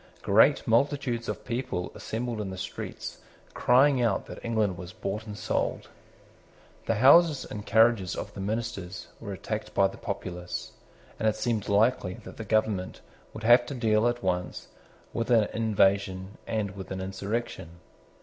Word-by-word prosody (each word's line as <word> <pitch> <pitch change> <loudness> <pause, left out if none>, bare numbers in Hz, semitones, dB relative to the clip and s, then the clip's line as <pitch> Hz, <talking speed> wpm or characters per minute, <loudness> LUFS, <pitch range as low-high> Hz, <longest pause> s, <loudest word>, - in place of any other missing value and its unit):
Great 110 +8 +4
multitudes 120 0 +1
of - - -5
people 120 -7 -3
assembled 115 -1 -4
in 100 - -4
the 95 - -6
streets 90 - -6 0.3
crying 130 +1 +4
out 115 -5 +1
that - - -10
England 110 -5 0
was 90 0 -9
bought 105 +4 -4
and 105 -1 -7
sold. - - -2 1.0
The 115 - +2
houses 145 +6 +6
and 105 -1 -8
carriages 110 -4 +4
of - - -6
the - - -9
ministers 95 -3 -4
were 105 -3 -7
attacked 105 +3 -5
by 100 - +5
the 95 - -2
populace; 90 -4 -5 0.5
and 110 - +3
it 105 - -2
seemed 115 -5 -1
likely 100 -2 +2
that - - -11
the 110 - -5
government 105 -3 0 0.3
would 110 - -9
have 120 +2 +7
to 140 - -5
deal 110 -2 +2
at 120 -2 -1
once 90 -1 -2 0.4
with 115 +1 -2
an 115 -3 +5
invasion 100 -3 +1
and 105 -3 -1
with 95 -2 -8
an 95 - -4
insurrection. 95 -2 -4
110 Hz, 160 wpm, -28 LUFS, 95-120 Hz, 1.0 s, have